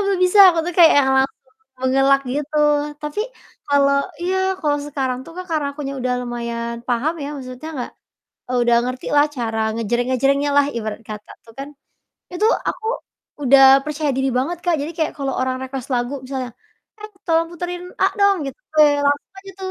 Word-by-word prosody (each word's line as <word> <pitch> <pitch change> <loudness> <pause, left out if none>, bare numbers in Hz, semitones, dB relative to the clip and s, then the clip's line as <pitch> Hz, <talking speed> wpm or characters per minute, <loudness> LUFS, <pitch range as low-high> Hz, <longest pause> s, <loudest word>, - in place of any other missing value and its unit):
belum 390 -2 0
bisa," 365 +3 +2 0.2
aku - - -1
tuh 355 - -2
kayak 330 -2 +8
yang 265 - +1
langsung 265 +1 +2 0.5
mengelak 270 +1 +3
gitu, 295 +1 -3 0.5
tapi 300 +7 -3 0.5
kalau 280 -1 +3 0.3
iya, 370 +2 0 0.3
kalau 290 -1 +1
sekarang 265 -3 -2
tuh, - - -11
Kak, 365 - -5
karena 305 -3 0
aku 300 - -9 0.2
udah 250 0 -1
lumayan 235 -1 -4
paham 250 +7 0
ya, - - -4
maksudnya 255 +3 -8
nggak 245 - -5 0.7
udah 240 0 +3
ngerti 255 0 -5
lah 290 - +6
cara 225 -2 -2
ngejreng-ngejrengnya 255 +5 0
lah 285 - +5
ibarat 215 0 -4
kata 210 -1 -8 0.2
tuh 225 - -15
kan. 280 +1 -6 0.6
Itu 360 +5 +1 0.2
aku 440 - -4 0.6
udah 270 +1 +6 0.2
percaya 300 -1 -2
diri 265 0 0
banget, 330 +6 -2
Kak. 350 -2 +2
Jadi 310 +4 -4
kayak 320 -2 -1
kalau 275 -1 -2
orang 255 0 -1
request 260 0 -6
lagu 245 +3 -1
misalnya, 260 -1 -4 0.5
"Eh 425 - -8 0.2
tolong 330 0 +2
puterin 355 +1 -5 0.2
A - - +6 0.2
dong," 400 -1 +5
gitu, 275 - -5 0.2
weh 300 -1 +7
langsung 285 0 0
aja 390 - -10
tuh 375 0 -4
275 Hz, 175 wpm, -20 LUFS, 255-315 Hz, 0.7 s, kayak